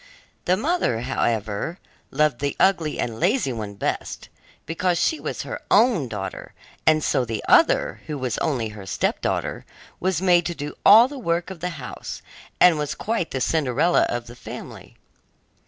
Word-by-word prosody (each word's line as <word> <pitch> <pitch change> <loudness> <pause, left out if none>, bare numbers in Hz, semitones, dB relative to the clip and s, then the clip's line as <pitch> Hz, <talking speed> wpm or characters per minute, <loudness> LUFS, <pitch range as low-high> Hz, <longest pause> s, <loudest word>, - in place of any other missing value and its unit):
The 180 +1 +3
mother, 280 - 0
however, 115 - -1 0.3
loved 150 -3 +1
the 140 0 -2
ugly 170 -6 +2
and 115 -2 -3
lazy 180 - +1
one 105 -3 -6
best, - - -4 0.4
because 175 +2 0
she 315 - +1
was - - -4
her - - -6
own 215 - +4
daughter, 95 -4 -6 0.3
and 155 -1 +4
so - - +1
the 115 -3 -4
other, - - +4
who 150 - -4
was 130 -4 -2
only 125 -8 -1
her 105 -2 -10
stepdaughter, - - -1 0.4
was 185 -1 0
made 175 -3 +3
to 175 - -4
do 145 -1 -6
all 225 +4 +8
the 280 0 -8
work 170 -3 -1
of 185 - -9
the 180 +3 -2
house, 125 -3 -7 0.4
and 175 -4 +6
was 150 -1 -2
quite 220 -6 -2
the 130 - -3
Cinderella 155 +4 +2
of 120 0 -3
the 120 - -12
family. - - -10
155 Hz, 165 wpm, -23 LUFS, 120-180 Hz, 0.4 s, all